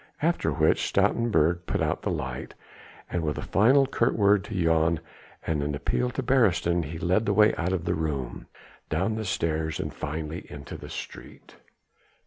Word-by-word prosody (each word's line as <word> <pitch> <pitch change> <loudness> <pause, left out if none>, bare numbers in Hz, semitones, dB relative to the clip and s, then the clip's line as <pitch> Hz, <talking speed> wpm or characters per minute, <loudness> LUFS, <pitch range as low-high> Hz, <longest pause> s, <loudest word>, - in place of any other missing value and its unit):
After 170 +2 +1
which 80 -1 +2
Stoutenburg 90 -7 +2
put - - -1
out - - 0
the - - -2
light, 65 0 -4 0.6
and 90 - 0
with 75 -5 -2
a - - -4
final 130 +8 +4
curt 125 -2 +1
word 100 -1 +4
to 110 - -7
Jan 80 -2 +2 0.5
and 80 -3 0
an 70 0 -2
appeal 125 +11 -1
to 130 +1 -4
Beresteyn 95 - +2
he 80 +3 -6
led 95 +6 +1
the 100 - +3
way 105 +1 +5
out 90 +2 -1
of 90 -3 -2
the - - +1
room, 70 -6 -3 0.4
down 95 +8 0
the 110 0 -3
stairs 80 -4 -1
and - - -4
finally 80 +3 -5
into 70 -2 -8
the - - -9
street. - - -9
85 Hz, 175 wpm, -27 LUFS, 80-105 Hz, 0.6 s, way